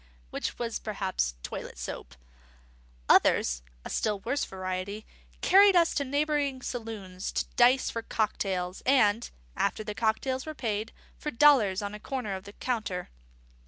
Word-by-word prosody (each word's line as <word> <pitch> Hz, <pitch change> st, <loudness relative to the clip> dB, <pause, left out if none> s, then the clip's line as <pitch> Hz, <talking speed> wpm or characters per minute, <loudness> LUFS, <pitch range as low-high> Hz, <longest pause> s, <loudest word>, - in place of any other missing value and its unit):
which -, -, -3 dB
was 230 Hz, -2 st, -3 dB
perhaps 190 Hz, -, -2 dB
toilet -, -, -6 dB
soap. -, -, -7 dB, 0.9 s
Others -, -, +4 dB, 0.2 s
(a -, -, -5 dB
still 210 Hz, -2 st, 0 dB
worse 285 Hz, +7 st, -1 dB
variety) 185 Hz, +3 st, -4 dB, 0.4 s
carried 395 Hz, +1 st, +7 dB
us 335 Hz, -2 st, +4 dB
to 285 Hz, -, 0 dB
neighbouring 285 Hz, -1 st, 0 dB
saloons 210 Hz, -6 st, -5 dB
to -, -, -1 dB
dice 250 Hz, +2 st, +4 dB
for 230 Hz, -, -3 dB
cocktails 190 Hz, -5 st, -2 dB
and 235 Hz, -4 st, +3 dB, 0.3 s
(after 215 Hz, -, 0 dB
the 210 Hz, -1 st, -4 dB
cocktails 245 Hz, +5 st, 0 dB
were 310 Hz, -, -5 dB
paid) 220 Hz, -3 st, -2 dB, 0.3 s
for 300 Hz, -, -3 dB
dollars 230 Hz, -8 st, +5 dB
on 205 Hz, 0 st, -4 dB
a 210 Hz, -, -7 dB
corner 245 Hz, -5 st, -3 dB
of 190 Hz, +1 st, -8 dB
the 200 Hz, -, -10 dB
counter. 210 Hz, -8 st, -3 dB
220 Hz, 145 wpm, -29 LUFS, 195-265 Hz, 0.9 s, carried